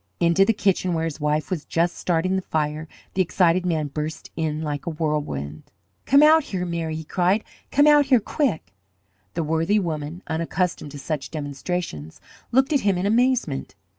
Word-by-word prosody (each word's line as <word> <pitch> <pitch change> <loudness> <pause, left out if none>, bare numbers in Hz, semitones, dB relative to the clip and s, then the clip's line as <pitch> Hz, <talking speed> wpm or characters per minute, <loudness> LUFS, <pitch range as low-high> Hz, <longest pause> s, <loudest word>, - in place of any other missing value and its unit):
Into 170 +3 +4
the 225 - +4
kitchen, 195 -4 +1
where 160 0 0
his 160 -2 -4
wife 150 +2 0
was 165 -5 -2
just 170 +1 0
starting 180 +2 0
the 190 - 0
fire, 155 -2 -2 0.3
the 190 - +2
excited 180 0 +2
man 160 -3 0
burst 150 +2 -5
like 155 -2 -3
a - - +2
whirlwind. 150 - -3 0.4
"Come 280 +2 +6
out 315 0 +6
here, 180 -2 -3
Mary!" 165 -2 -3
he 160 - -5
cried. 185 +6 +1 0.3
"Come 285 +2 +4
out 295 -2 +6
here, 260 -3 +5
quick!" 220 - -2 0.6
The 165 - 0
worthy 165 +6 +1
woman, 160 -2 -3
unaccustomed 165 0 -2
to - - -7
such 145 0 -4
demonstrations, 145 - -5 0.3
looked 265 +5 +3
at 285 - +4
him 200 -5 +1
in 180 - -1
amazement. 230 - +1
170 Hz, 170 wpm, -23 LUFS, 155-195 Hz, 0.6 s, Come